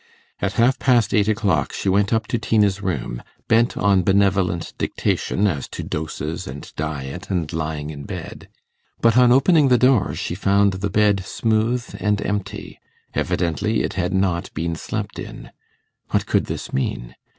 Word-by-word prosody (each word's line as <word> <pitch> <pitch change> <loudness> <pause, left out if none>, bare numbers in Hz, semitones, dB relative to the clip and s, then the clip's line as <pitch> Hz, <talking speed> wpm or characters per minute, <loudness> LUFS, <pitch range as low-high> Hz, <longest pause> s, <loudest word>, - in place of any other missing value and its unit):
At 100 0 -1
half 125 +4 +3
past 120 -4 +3
eight 105 -1 +3
o'clock 105 -6 +1
she - - -4
went 100 +1 +2
up 110 -2 +1
to 120 - 0
Tina's 105 -2 +2
room, 70 -10 -3 0.3
bent 115 +2 +3
on 100 -2 +3
benevolent 95 -3 +1
dictation 100 - 0
as 75 -10 -1
to - - -6
doses 80 0 -4
and 70 +3 -9
diet 75 +3 -5
and 90 -5 -2
lying 80 -2 -3
in 70 -2 -8
bed. - - -8 0.5
But 115 -1 +3
on 125 -1 +6
opening 145 +3 +5
the 125 -1 +5
door 125 -2 +3
she - - -3
found 100 +1 +2
the 100 +2 -2
bed 100 -1 +2
smooth 115 +4 0
and 105 +1 +1
empty. 105 0 -4 0.3
Evidently 90 +6 0
it - - -2
had 90 -2 -1
not 95 -3 0
been 85 0 -2
slept - - -5
in. - - -9 0.6
What - - +1
could - - +1
this - - -5
mean? - - -2
100 Hz, 160 wpm, -21 LUFS, 85-110 Hz, 0.6 s, on